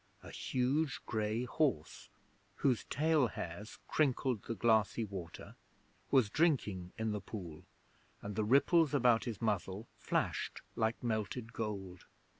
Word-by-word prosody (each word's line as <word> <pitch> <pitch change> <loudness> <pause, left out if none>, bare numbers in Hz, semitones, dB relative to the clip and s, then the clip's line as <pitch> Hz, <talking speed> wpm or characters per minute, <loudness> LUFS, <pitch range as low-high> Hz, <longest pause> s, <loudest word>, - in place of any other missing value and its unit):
A - - -9
huge 135 +4 0
grey 110 +1 -1
horse, 140 +3 -1 0.5
whose 125 -7 +1
tail 155 -3 +2
hairs 100 +1 -7
crinkled 130 -6 +1
the 115 - -4
glassy 110 0 +2
water, 95 -5 -8 0.5
was 130 -6 +5
drinking 105 - +1
in 110 0 -1
the 105 -1 -3
pool, 90 -6 -8 0.5
and 100 0 -6
the 110 - +1
ripples 145 +6 +4
about 120 -4 +4
his 115 -5 -4
muzzle 105 -1 -1
flashed - - -1
like 110 +2 0
melted 115 +1 -2
gold. 100 -5 -5
110 Hz, 125 wpm, -35 LUFS, 105-130 Hz, 0.5 s, was